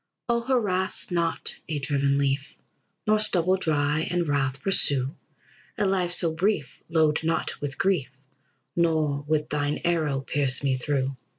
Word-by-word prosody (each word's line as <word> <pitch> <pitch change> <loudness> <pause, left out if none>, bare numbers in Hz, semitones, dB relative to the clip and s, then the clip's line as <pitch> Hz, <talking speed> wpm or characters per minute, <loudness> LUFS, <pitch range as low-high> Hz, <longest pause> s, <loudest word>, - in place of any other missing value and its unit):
O 235 -1 +1
harass 210 -9 +1
not 170 -2 -1
a 155 - -1
driven 140 -1 +1
leaf, 140 0 -1 0.5
Nor 215 0 +3
stubble 185 -3 +2
dry 150 -3 +1
in 175 0 +1
wrath 140 -2 0
pursue; 140 -8 +2 0.6
A 210 - +1
life 185 -2 +1
so 170 -2 +2
brief 175 -3 -1
load 160 -2 +2
not 165 0 -1
with 145 -1 -2
grief, 175 -9 +1 0.7
Nor 155 -4 +1
with 155 -1 0
thine 145 0 0
arrow 155 -6 +1
pierce 135 0 0
me 135 -2 +2
through. 135 +1 -1
155 Hz, 140 wpm, -26 LUFS, 140-175 Hz, 0.7 s, Nor